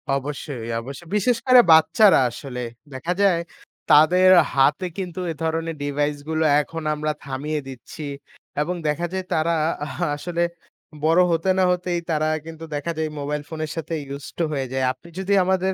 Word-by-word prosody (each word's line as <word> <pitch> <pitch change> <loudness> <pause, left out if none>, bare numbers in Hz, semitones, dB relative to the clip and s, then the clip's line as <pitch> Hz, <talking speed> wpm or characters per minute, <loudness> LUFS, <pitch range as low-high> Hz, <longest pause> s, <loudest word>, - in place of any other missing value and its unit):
অবশ্যই, 140 -3 -5
অবশ্য 135 +5 -8
বিশেষ 225 +4 +2
করে 255 -1 +8
বাচ্চারা 160 +6 +6
আসলে 125 +1 -7 0.3
দেখা 165 +7 -2
যায়, 185 -4 +4 0.5
তাদের 180 +5 +6 0.3
হাতে 145 +7 +3
কিন্তু 185 -2 -5
এ - - -3
ধরনের 165 0 -1
ডিভাইসগুলো 145 +2 -1 0.2
এখন 165 +2 -7
আমরা 155 0 -1
থামিয়ে 145 +3 -3
দিচ্ছি 135 +4 -9 0.6
এবং 175 +4 -1
দেখা 150 +3 0
যায় 190 -1 -3
তারা 165 +2 +1 0.3
আ - - -6 0.3
আসলে 170 +3 -2 0.6
বড় 165 +3 +5
হতে 165 +3 0
না 190 - +4
হতেই 180 -1 -1
তারা 155 0 +1 0.2
কিন্তু 165 0 -9
দেখা 145 +4 -2
যায় 160 -1 -1
মোবাইল 145 +1 -2
ফোনের 155 -1 -4
সাথে 165 0 -5 0.2
use 140 0 -9
to 170 - +1
হয়ে 135 -2 -2
যায়। 130 -1 +1
আপনি 130 +6 -13
যদি 190 +1 0
আমাদের 190 +1 +1
160 Hz, 160 wpm, -23 LUFS, 145-175 Hz, 0.6 s, করে